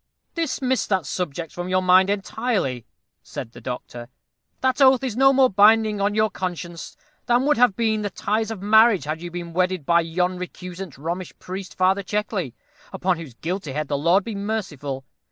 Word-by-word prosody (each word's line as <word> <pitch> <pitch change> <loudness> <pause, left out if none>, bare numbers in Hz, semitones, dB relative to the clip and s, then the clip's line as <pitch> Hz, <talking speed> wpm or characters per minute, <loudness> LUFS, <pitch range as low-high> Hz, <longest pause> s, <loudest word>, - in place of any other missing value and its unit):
dismiss 265 -6 -1
that 190 -6 0
subject 170 0 -4
from 175 +1 -5
your 185 0 +3
mind 185 +1 +5
entirely," 195 - -2 0.3
said 115 - -8
the 120 - -13
doctor. 120 0 -7 0.5
"That 260 +2 +1
oath 260 -1 +6
is 250 -5 -2
no 270 +2 +6
more 265 -1 +5
binding 210 0 +4
on 205 +1 +1
your 215 -1 +2
conscience 175 -2 -6 0.3
than 245 +2 +3
would 295 -3 +3
have 245 -5 +4
been 220 -2 0
the 205 - -2
ties 215 +4 -1
of 210 -4 -6
marriage 220 - +5
had 155 +2 -4
you 175 - -6
been 170 -1 -7
wedded 180 -3 0
by 170 +2 +4
yon 180 +2 -1
recusant 180 -2 -7
Romish 170 +5 -5
priest, 185 -3 -8
Father 190 +2 +3
Checkley, 200 - -3 0.4
upon 185 -2 0
whose 155 -8 -9
guilty 165 0 -4
head 150 0 -3
the 145 - 0
Lord 170 +7 +3
be 225 - -5
merciful! 165 -11 -4
185 Hz, 180 wpm, -23 LUFS, 170-215 Hz, 0.5 s, oath